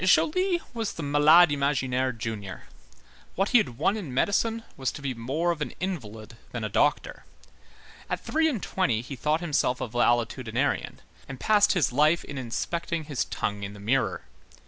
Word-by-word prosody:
Joly 350 Hz, -, +3 dB
was 225 Hz, -3 st, -3 dB
the 165 Hz, -, -6 dB
"malade 150 Hz, +3 st, +6 dB
imaginaire" 130 Hz, -2 st, 0 dB
junior. 110 Hz, -5 st, -6 dB, 0.7 s
What 195 Hz, +2 st, +1 dB
he 245 Hz, -, +6 dB
had 125 Hz, -, -2 dB
won 195 Hz, +8 st, +2 dB
in 190 Hz, -11 st, -5 dB
medicine 225 Hz, -, +1 dB
was 130 Hz, -1 st, -2 dB
to -, -, -8 dB
be 135 Hz, -2 st, -1 dB
more 135 Hz, +9 st, -1 dB
of 165 Hz, -3 st, -5 dB
an -, -, -3 dB
invalid 115 Hz, -, -5 dB, 0.2 s
than 120 Hz, -2 st, -4 dB
a 110 Hz, -, -2 dB
doctor. 145 Hz, +9 st, 0 dB, 0.9 s
At -, -, -1 dB
three 320 Hz, 0 st, +1 dB
and 240 Hz, -10 st, -3 dB
twenty 125 Hz, -13 st, 0 dB
he 130 Hz, +3 st, -7 dB
thought 150 Hz, +6 st, 0 dB
himself 145 Hz, -6 st, 0 dB
a -, -, -3 dB
valetudinarian, 120 Hz, +2 st, 0 dB, 0.3 s
and 135 Hz, -2 st, -7 dB
passed 210 Hz, -2 st, +4 dB
his 160 Hz, -, +1 dB
life 150 Hz, +6 st, +3 dB
in 140 Hz, -2 st, -6 dB
inspecting 165 Hz, +7 st, -3 dB
his 145 Hz, -4 st, -2 dB
tongue 105 Hz, 0 st, -3 dB
in 100 Hz, 0 st, -5 dB
the -, -, -11 dB
mirror. 120 Hz, +7 st, 0 dB
145 Hz, 170 wpm, -27 LUFS, 120-175 Hz, 0.9 s, malade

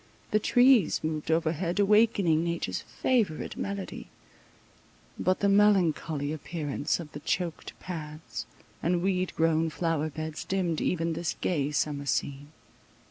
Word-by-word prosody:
The 215 Hz, -, +4 dB
trees 245 Hz, -, +4 dB
moved 155 Hz, -1 st, -3 dB
overhead, 165 Hz, +3 st, 0 dB
awakening 200 Hz, -6 st, +4 dB
nature's 170 Hz, 0 st, -2 dB
favourite 220 Hz, -12 st, -1 dB
melody—but 185 Hz, -, -6 dB
the 200 Hz, -, +3 dB
melancholy 175 Hz, -7 st, +3 dB
appearance 155 Hz, -1 st, -2 dB
of 155 Hz, -3 st, -8 dB
the 145 Hz, -, -7 dB
choaked 170 Hz, +2 st, -3 dB
paths, 155 Hz, -8 st, -7 dB, 0.3 s
and 175 Hz, +1 st, +1 dB
weed 185 Hz, -1 st, 0 dB
grown 160 Hz, 0 st, +2 dB
flower 160 Hz, -1 st, -1 dB
beds, 155 Hz, 0 st, -5 dB
dimmed 180 Hz, -4 st, -1 dB
even 165 Hz, -2 st, 0 dB
this 170 Hz, +1 st, -2 dB
gay 145 Hz, -6 st, 0 dB
summer 145 Hz, -1 st, -1 dB
scene. 140 Hz, +2 st, -2 dB
165 Hz, 120 wpm, -28 LUFS, 155-185 Hz, 0.3 s, The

